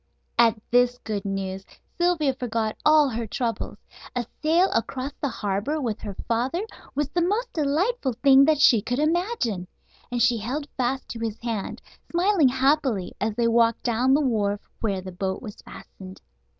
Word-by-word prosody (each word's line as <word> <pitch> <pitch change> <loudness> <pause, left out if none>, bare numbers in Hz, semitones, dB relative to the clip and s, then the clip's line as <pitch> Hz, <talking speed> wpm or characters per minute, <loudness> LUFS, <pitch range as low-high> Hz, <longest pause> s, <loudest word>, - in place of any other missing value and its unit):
At 230 -1 +5
this 245 0 +4
good 205 -3 -3
news 195 -1 -3 0.4
Sylvia 340 -6 +2
forgot 230 -4 -2
all 305 -1 +6
her 230 -3 -3
troubles. 230 +1 -3 0.4
A 245 -1 -1 0.2
sail 335 +5 +3
across 260 +4 -2
the 285 - 0
harbor 210 +7 -2
with 230 -6 -2
her 205 -2 -6
father 250 - 0 0.3
was 295 0 0
the 345 +4 0
most 420 +8 0
delightful 310 - 0
thing 270 +3 +6
that 310 -1 +3
she 235 -6 +6
could 245 +4 -2
imagine. 305 - 0 0.4
And 245 - -1
she 235 +1 +4
held 270 +7 -3
fast 260 +1 -1
to 230 - -6
his 225 -1 -3
hand, 225 -4 -4 0.3
smiling 345 -4 +3
happily, 265 -6 +1
as 215 0 -1
they 235 0 +2
walked 230 0 +3
down 250 +3 +3
the 300 - +3
wharf 210 -6 0
where 200 -4 -1
the 185 0 -8
boat 190 +1 -3
was 210 -4 -9
fastened. 185 0 -12
245 Hz, 165 wpm, -25 LUFS, 220-295 Hz, 0.4 s, all